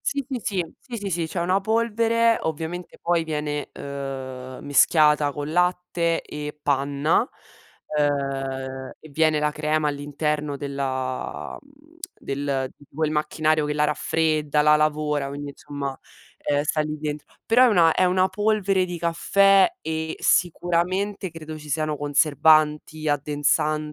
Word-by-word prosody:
Sì, 280 -1 -2
sì, 260 -3 -2
sì, 180 -5 -2
sì, 245 -3 -7
sì, 200 -3 -4
sì. 170 -2 -1
C'è 170 +2 -4
una 185 +3 +2
polvere, 230 +2 +2
ovviamente 160 +3 -4
poi 170 -1 +1
viene, 150 -1 -3
uhm, 130 -2 -6
mischiata 150 0 +4
con 145 +2 -5
latte 180 -1 +1
e 150 0 -7
panna, 145 - +1 0.7
ehm, 135 -2 -2
e 155 - -14
viene 155 +1 +2
la 150 0 +1
crema 155 0 0
all'interno 145 0 -2
della 135 -2 -4
mhmm, 290 +4 -23 0.2
del 135 -1 -2
di 145 - -19
quel 155 0 0
macchinario 155 0 +1
che 150 - -2
la 150 - +2
raffredda, 150 0 +1
la 150 0 +6
lavora, 150 -2 0
quindi 145 +1 -6
insomma, 140 -1 -6 0.4
ehm, 145 0 0
sta 155 +1 0
lì 150 0 -2
dentro. 150 -1 -4 0.2
Però 245 +3 +5
è - - +7
una 170 -7 +5
è - - +3
una 185 +1 +3
polvere 200 -1 +1
di 175 -1 -5
caffè 195 +4 +4
e 160 0 -3
sicuramente 180 +3 +1
credo 155 -1 -8
ci 150 0 -12
siano 155 +1 -1
conservanti, 150 +1 +2
addensan 150 +1 0
155 Hz, 140 wpm, -24 LUFS, 145-175 Hz, 0.7 s, è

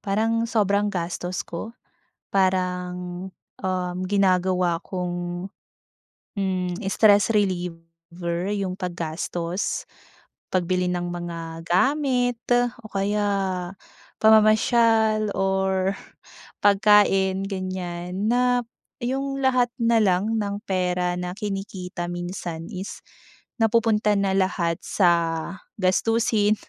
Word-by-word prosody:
parang 225 +3 +1
sobrang 205 -2 +2
gastos 180 -1 -3
ko. 175 +7 -6 0.6
Parang, 180 -1 -1 0.3
um, 185 -1 -2
ginagawa 185 -3 +2
kong, 175 0 -4 0.9
hmm, 185 -2 -1
stress 205 0 +5
reliever 170 -2 -2
'yung 195 -3 -2
paggastos, 175 0 -3 0.6
pagbili 180 0 0
ng 175 0 -1
mga 170 -2 -6
gamit 250 - +2 0.4
o 220 - -11
kaya 205 +1 0 0.9
pamamasyal 220 0 +4
or 190 0 +1 0.7
pagkain 195 -1 +4
ganyan. 185 0 -3
Na 245 0 +3 0.4
'yung 275 +2 -2
lahat 250 -2 +3
na 230 0 +4
lang 200 +4 +2
ng 200 -1 -2
pera 180 -1 0
na 180 0 -4
kinikita 195 -4 -4
minsan 175 -2 -5
is 190 +1 -6 0.6
napupunta 225 -1 +3
na 195 -1 +1
lahat 180 -3 +1
sa 185 -4 +3 0.7
gastusin. 215 +2 +2
190 Hz, 90 wpm, -24 LUFS, 180-210 Hz, 0.9 s, stress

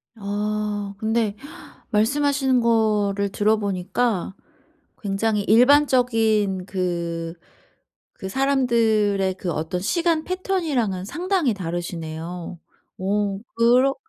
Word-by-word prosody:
아. 205 0 -3
근데 220 -1 0 0.6
말씀하시는 265 +3 +2
거를 210 -3 +1
들어보니까 205 0 0 0.7
굉장히 210 +1 0
일반적인 225 -6 +3
그, 170 -3 -3 0.8
그 190 - -7
사람들의 220 -7 +2
그 185 -2 -4
어떤 160 +3 -3
시간 335 - +1
패턴이랑은 310 - -1
상당히 340 - 0
다르시네요. 170 -1 -5 0.4
어 200 +1 -1 0.2
그러 250 +4 +4
210 Hz, 210 characters per minute, -23 LUFS, 190-245 Hz, 0.8 s, 그러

